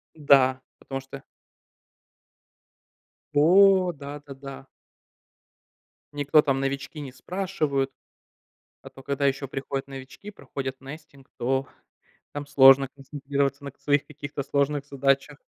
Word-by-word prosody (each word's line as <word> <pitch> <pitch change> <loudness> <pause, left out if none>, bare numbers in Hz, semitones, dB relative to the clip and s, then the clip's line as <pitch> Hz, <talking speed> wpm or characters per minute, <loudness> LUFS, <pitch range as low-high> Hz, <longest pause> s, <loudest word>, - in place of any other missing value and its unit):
Да, 135 -3 +4 0.2
потому 135 -1 -6
что 135 0 -11 2.1
О, 185 +4 +5
да-да-да. 140 -1 -9 1.5
Никто 145 +1 +4
там 135 -2 0
новички 135 +2 -3
не 135 - -7
спрашивают. 145 -3 -2 0.9
А - - -10
то 135 - -14
когда 140 +1 -1
еще 135 0 -1
приходят 135 0 -4
новички, 135 +9 -10
проходят 135 -9 -6
nesting, 140 0 -12
то 135 +3 -1 0.7
там 145 0 -6
сложно 135 -1 +7
концентрироваться 140 0 -3
на 140 - -5
к - - -40
своих 145 -1 +1
каких-то 145 -1 -6
сложных 140 +1 0
задачах. 140 +1 0
140 Hz, 110 wpm, -25 LUFS, 135-145 Hz, 2.1 s, сложно